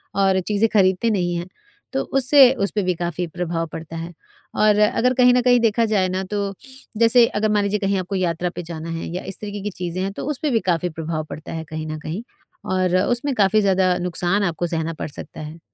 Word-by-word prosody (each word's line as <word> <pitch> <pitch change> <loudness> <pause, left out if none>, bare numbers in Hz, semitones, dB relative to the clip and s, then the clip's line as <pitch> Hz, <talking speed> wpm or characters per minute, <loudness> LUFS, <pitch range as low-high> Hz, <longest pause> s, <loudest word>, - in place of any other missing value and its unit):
और 195 -1 +3
चीज़ें 210 +1 +2
खरीदते 190 +2 +3
नहीं 175 -4 0
हैं, 170 +1 -4 0.5
तो 270 - 0
उससे 270 -1 +7
उसपे 205 -2 -1
भी 180 0 +1
काफ़ी 175 +1 -3
प्रभाव 165 0 -3
पड़ता 160 +1 -8
है। 165 +2 -6 0.5
और 210 -1 +4
अगर 230 +4 +3
कहीं 250 -1 +5
न 250 - +3
कहीं 245 0 +4
देखा 230 0 +2
जाए 205 -4 +1
ना, 185 +1 -2
तो 200 0 -3 0.4
जैसे 230 +1 +6
अगर 215 0 -1
मान 210 -1 +2
लीजिए 200 +1 0
कहीं 195 0 0
आपको 185 +2 -4
यात्रा 180 -1 -1
पे 175 - -5
जाना 165 -1 -7
है 165 0 -4
या - - -4
इस 195 - -7
तरीके 205 -1 -5
की 210 - -2
चीज़ 180 0 -5
हैं, 195 +1 -1
तो 200 - -6
उसपे 300 +1 -2
भी 225 - +3
काफ़ी 175 +1 0
प्रभाव 160 -1 -4
पड़ता 155 - -8
है 160 - -4
कहीं 155 0 -5
न 155 0 -5
कहीं। 165 +8 -5 0.5
और 185 -1 +1
उसमें 245 +6 0
काफ़ी 210 0 +3
ज़्यादा 190 -2 +2
नुकसान 180 +2 0
आपको 175 -1 -1
सहना 165 -1 -2
पड़ - - -5
सकता - - -9
है। 155 +2 -8
190 Hz, 220 wpm, -21 LUFS, 170-215 Hz, 0.5 s, उससे